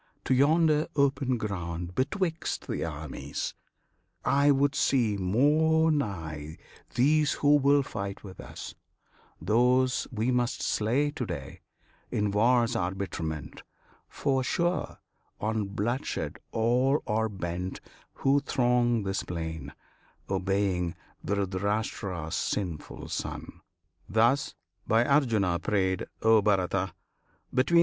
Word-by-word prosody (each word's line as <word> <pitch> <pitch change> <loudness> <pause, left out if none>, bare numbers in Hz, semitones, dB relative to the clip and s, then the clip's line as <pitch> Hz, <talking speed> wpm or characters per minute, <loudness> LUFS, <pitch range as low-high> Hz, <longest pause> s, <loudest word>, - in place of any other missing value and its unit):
to - - +2
yonder 155 +3 +4
open 135 -3 +2
ground 90 -5 -4
Betwixt 165 - -1
the - - -2
armies; 75 -2 -5 0.7
I 140 +1 +4
would 140 0 +3
see 120 -6 +2
more 150 - +3
nigh 80 - -3 0.4
These 150 +3 +3
who 145 0 +4
will 140 0 +4
fight 100 -6 -5
with 95 -3 -10
us, - - -8 0.7
those 125 +7 +2
we 115 +2 0
must 125 0 0
slay 130 +7 +1
To - - -4
day, - - -6 0.5
in 105 -1 0
war's 120 +3 +3
arbitrament; 90 - -3 0.5
for, 135 -2 0
sure, 175 +6 -1 0.4
On 110 0 -1
bloodshed 110 +6 -2
all 125 +5 +2
are 110 0 0
bent 90 -1 -4 0.4
who 140 +1 +3
throng 120 -4 +2
this 95 0 -1
plain, 80 -4 -5 0.6
Obeying 95 -2 0 0.3
Dhritirashtra's 100 -3 -2
sinful 90 -2 -3
son." - - -5 0.5
Thus, 120 +7 +2 0.3
by 115 +2 +4
Arjuna 110 - +2
prayed, 95 -1 0 0.2
(O 110 -1 +6
Bharata!) 95 -3 +1
110 Hz, 105 wpm, -28 LUFS, 95-135 Hz, 0.7 s, O